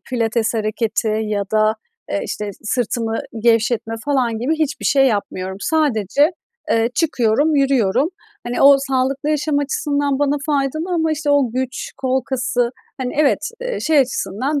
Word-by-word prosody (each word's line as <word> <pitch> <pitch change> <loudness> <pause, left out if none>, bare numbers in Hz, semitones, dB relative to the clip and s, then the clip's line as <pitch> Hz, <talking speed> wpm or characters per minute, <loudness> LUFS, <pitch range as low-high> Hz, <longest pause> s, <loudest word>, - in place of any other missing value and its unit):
pilates 230 -1 0
hareketi 220 0 -1
ya 210 -2 -1
da, 215 0 +3 0.4
eee, 200 - 0
işte, 210 -1 -4
sırtımı 225 0 -1 0.2
gevşetme 230 -1 +2
falan 255 -6 0
gibi 265 +8 0
hiçbir 310 -1 -2
şey 270 -1 +4
yapmıyorum. 190 -4 -2
Sadece, 290 - +2 0.4
eee, 230 +1 +2
çıkıyorum, 290 -1 +2
yürüyorum. 270 - +2 0.4
Hani, 240 - -1
o 280 0 +8
sağlıklı 270 +2 -1
yaşam 300 -1 +1
açısından 285 0 0
bana 290 0 +1
faydalı 305 +5 -1
ama 320 -2 +1
işte 300 -1 -1
o 280 -4 +3
güç, 260 +1 -3
kol 260 0 0
kası, 245 -2 0 0.3
hani, 250 -1 -3
evet, 300 -2 +2
eee, - - -3
şey 310 -1 +3
açısından 260 +3 0
260 Hz, 145 wpm, -19 LUFS, 225-290 Hz, 0.4 s, o